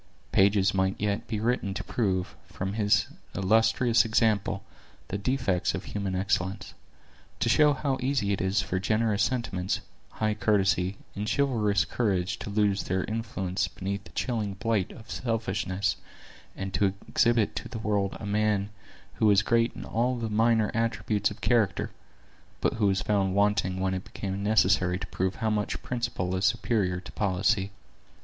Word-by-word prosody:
Pages 100 0 +4
might 95 0 0
yet 105 +2 -1
be 110 -3 -2
written 110 -4 0
to - - -3
prove, 95 -6 -1
from 95 +1 -4
this 105 -1 +2 0.3
illustrious 110 +4 +3
example, 110 -3 +1 0.5
the 100 - -2
defects 100 -5 0
of - - -5
human 100 -2 -3
excellence; 95 0 -1 0.7
to - - +1
show 150 +5 +5
how 135 -1 -1
easy 125 -6 +1
it 95 - -2
is 95 +3 +1
for 95 -1 -2
generous 110 +1 +1
sentiments, 100 -7 -1 0.3
high 110 -1 0
courtesy, 95 -2 +1 0.2
and 105 +2 -2
chivalrous 110 - +2
courage 95 -3 -1
to - - -6
lose 100 -1 +1
their 95 0 0
influence 105 -4 -2
beneath 100 +1 -4
the - - -12
chilling 110 -6 -2
blight 105 -1 0
of 110 - -12
selfishness, 100 -4 -1 0.6
and 95 0 -5
to 100 -2 +1
exhibit 115 -2 +2
to - - -5
the 125 - -6
world 105 -3 -1
a - - -6
man 105 -1 +1 0.5
who 110 - +3
was 105 0 +5
great 115 +1 +2
in - - -7
all 125 +3 0
the 115 -2 -3
minor 110 0 +3
attributes 110 -3 0
of 105 - -10
character, 115 -5 +1 0.7
but - - +1
who 110 -2 +1
was 95 -1 +1
found 95 -2 +1
wanting 100 -2 +2
when 95 0 0
it 95 0 -3
became 95 0 -5
necessary 95 -3 +3
to 95 - -5
prove 95 +1 -2
how 110 -1 -1
much 105 -1 -1
principle 120 -7 -2
is 95 - -2
superior 95 -7 +1
to 90 - -11
policy. 100 0 +1
100 Hz, 160 wpm, -28 LUFS, 95-110 Hz, 0.7 s, show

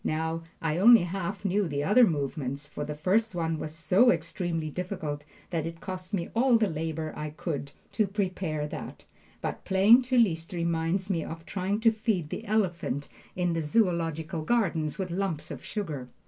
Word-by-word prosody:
Now, 160 +1 -1 0.2
I 165 +1 0
only 230 0 +8
half 180 +2 -4
knew 200 0 +2
the 145 -2 -2
other 225 +7 +6
movements, 140 -3 -2
for 150 - -6
the 150 0 -4
first 190 +7 +1
one 165 -2 -1
was 155 - -4
so 180 +9 +4
extremely 170 -9 -1
difficult 155 -5 -4 0.3
that 165 -2 -1
it 165 0 -7
cost 185 0 -6
me 175 -5 -2
all 245 0 +5
the 215 -5 +1
labor 160 0 -3
I 150 0 -4
could 150 -2 -4
give 140 - -23
to 215 -3 +1
prepare 185 -6 -2
that. - - -8 0.4
But - - -4
playing 200 +6 +6
to 255 - +3
Liszt 175 -6 +2
reminds 170 +3 0
me 165 -3 0
of 165 0 -7
trying 200 +4 -2
to 225 0 +6
feed 215 -8 -1
the 225 - -5
elephant 175 - -1 0.3
in 180 -1 +1
the 165 - 0
Zoological 165 -3 0
Garden 165 -6 +1
with 185 -2 -3
lumps 170 -5 -2
of - - -7
sugar. 150 - -4
170 Hz, 180 wpm, -28 LUFS, 155-200 Hz, 0.4 s, only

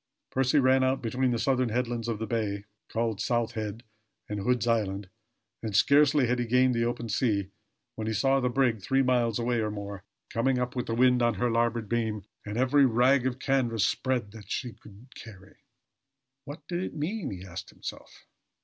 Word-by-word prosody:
Percy 135 +2 +2
ran 130 -1 +4
out 130 +1 +1
between 125 +2 0
the 120 - 0
southern 130 0 +1
headland 120 0 -2
of 115 -2 -1
the 110 - -3
bay, 105 -3 -2 0.2
called 110 -2 -1
South 120 0 0
Head 110 0 -5 0.4
and 105 -1 -4
Hood's 125 +4 +1
Island, 100 -4 0 0.5
and 110 -3 -4
scarcely 145 +3 +5
had 125 +1 0
he 120 - -1
gained 125 +2 +4
the 115 0 +1
open 120 0 -3
sea 105 -4 0 0.4
when 110 -2 -5
he 110 - 0
saw 135 +5 +2
the 125 -1 +1
brig 120 -4 +1
three 135 +7 +2
miles 120 -3 +2
away 120 0 0
or 110 -1 0
more, 100 -2 -6 0.3
coming 125 +3 +1
up 125 0 -2
with 125 - -2
the 115 - -1
wind 125 0 +4
on 120 -2 +2
her 120 +5 0
larboard 115 -1 0
beam 110 -3 -1 0.2
and 105 +2 -4
every 130 +2 +4
rag 125 +2 +3
of 125 -1 -3
canvas 125 -5 +1
spread 125 -6 -1
that 110 -2 -12
she 125 -4 -3
could 105 +2 -16
carry. 100 -4 -13 0.9
What 145 +1 -9
did 175 0 -2
it 185 - -5
mean? 160 +3 -3
he 95 -1 -7
asked 90 0 -8
himself. - - -10
120 Hz, 195 wpm, -28 LUFS, 110-130 Hz, 0.9 s, scarcely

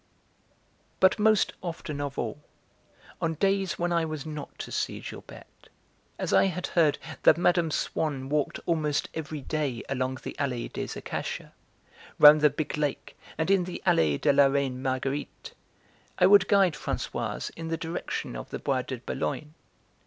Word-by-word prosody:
But 190 +3 +4
most 215 -1 +3
often 160 -4 -5
of 140 -1 -4
all, 120 +5 -3 0.8
on 165 -1 0
days 195 +2 +1
when 175 0 0
I 170 -1 +2
was 155 -2 -4
not 150 -2 -7
to - - -7
see - - -2
Gilberte, - - -11 0.5
as - - -2
I - - +6
had 180 -1 -2
heard 160 -4 +2 0.2
that 155 - +6
Mme. 175 -1 +3
Swann 145 -3 -2
walked 145 0 -1
almost 155 -3 0
every 155 -2 -5
day 140 -5 -2
along 130 -1 -1
the - - -6
Allée 125 -4 -2
des - - -4
Acacias, - - -5 0.7
round 150 0 +9
the 150 - +6
big 150 +2 -3
lake, 145 -2 -2 0.2
and 160 +4 0
in 190 -3 +3
the 180 - -6
Allée 75 -3 +3
de - - +3
la 140 0 +6
Reine 135 -2 -1
Marguerite, 135 +2 -3 0.6
I 180 - +5
would 195 0 +7
guide 195 -5 +4
Françoise 150 - -3
in 165 0 -6
the 165 0 -1
direction 165 - -4
of - - -7
the - - -4
Bois 130 -2 0
de 130 0 -5
Boulogne. 150 +5 -4
150 Hz, 160 wpm, -27 LUFS, 135-170 Hz, 0.8 s, round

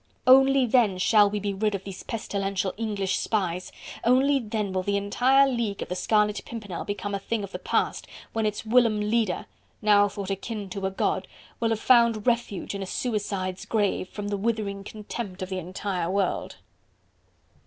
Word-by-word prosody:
Only 270 +1 +6
then 225 -5 +3
shall 205 +2 +5
we 210 +1 -2
be 200 0 -2
rid 210 +1 0
of 195 - -5
these 195 -2 -8
pestilential 195 -3 -2
English 205 -4 -1
spies, 185 -4 -1 0.3
only 270 +4 +4
then 215 -4 -3
will 185 - 0
the 200 +2 0
entire 255 +7 +4
League 235 -6 -1
of - - -11
the 180 - -2
Scarlet 210 +1 +2
Pimpernel 205 -7 -6
become 205 0 -4
a 200 - -1
thing 215 +2 -2
of 200 - -7
the - - -5
past - - -1 0.3
when 225 -1 +1
its 210 +1 -4
whilom 230 -2 +4
leader, 210 -3 0 0.3
now 205 -1 +5
thought 200 -1 -5
akin 200 0 -5
to 195 0 -2
a - - -1
god, 190 - -1 0.3
will 230 - +1
have 225 -1 0
found 235 -3 +4
refuge 235 -7 0
in 200 - -4
a 195 - -4
suicide's 200 -5 -2
grave, 205 -4 0
from 205 -1 -5
the 205 - -1
withering 205 -2 -2
contempt 205 -2 -6
of 185 - -6
the 190 -1 -2
entire 180 0 -3
world." 195 -1 -1
205 Hz, 180 wpm, -26 LUFS, 195-225 Hz, 0.3 s, Only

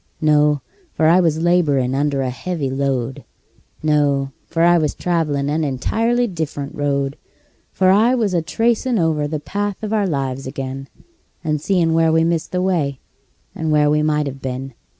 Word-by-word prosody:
No 150 -2 +3 0.3
for 160 - +1
I 170 +3 +6
was 165 -2 +1
laborin' 145 -8 +2
under 140 0 0
a 130 - -2
heavy 145 +1 -3
load; 135 -2 -2 0.6
No 145 -3 +1 0.2
for 165 - 0
I 175 0 +5
was 150 -2 -1
travelin' 155 -5 -1
an 155 +2 0
entirely 225 - 0
different 155 -8 -4
road; 140 -1 -1 0.5
For 185 -1 +3
I 225 +6 +4
was 215 -6 0
a 170 - +2
tracin' 235 +7 0
over 160 -4 +1
the 155 0 -3
path 205 +6 -4
of 215 0 -2
our 210 -2 +1
lives 135 -4 -3
ag'in, 135 +1 -5 0.6
And 155 -2 -1
seein' 170 -2 +1
where 165 0 +3
we 160 0 +3
missed 165 -1 -1
the 180 0 0
way, 155 -8 0 0.5
and 160 -1 -2
where 150 -1 +3
we 150 0 +2
might 150 -1 +1
have 135 -1 -6
been. 130 +1 -5
155 Hz, 170 wpm, -19 LUFS, 140-175 Hz, 0.6 s, I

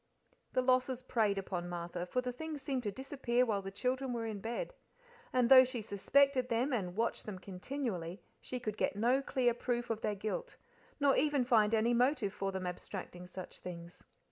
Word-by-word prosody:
The 255 - +2
losses 255 0 +2
preyed 220 -5 +1
upon 180 -2 -3
Martha, 175 0 -4
for 250 - 0
the 250 0 -3
things 305 +2 -6
seemed 270 -2 -1
to 210 -4 -2
disappear 255 0 0
while 210 -4 0
the 195 - -5
children 255 +5 -1
were 230 -1 -2
in 215 -2 -4
bed; 240 - -3 0.6
and 250 -2 +3
though 260 +1 +10
she 250 -3 -4
suspected 255 +5 +3
them, 245 +4 +1
and 185 -6 -1
watched 230 +1 -1
them 205 -3 -4
continually, 185 -2 -4 0.2
she 250 - -4
could 215 -3 -4
get - - 0
no 245 +6 +3
clear 250 -3 +2
proof 240 0 -2
of 225 -1 -2
their 210 - 0
guilt, 215 - -4 0.4
nor 280 -2 +4
even 290 -2 +3
find 225 -3 +4
any 225 +2 +3
motive 245 -4 +2
for 195 -1 -2
them 190 -1 -4
abstracting 180 0 -6
such 185 0 -8
things. 170 -1 -9
235 Hz, 190 wpm, -34 LUFS, 195-255 Hz, 0.6 s, though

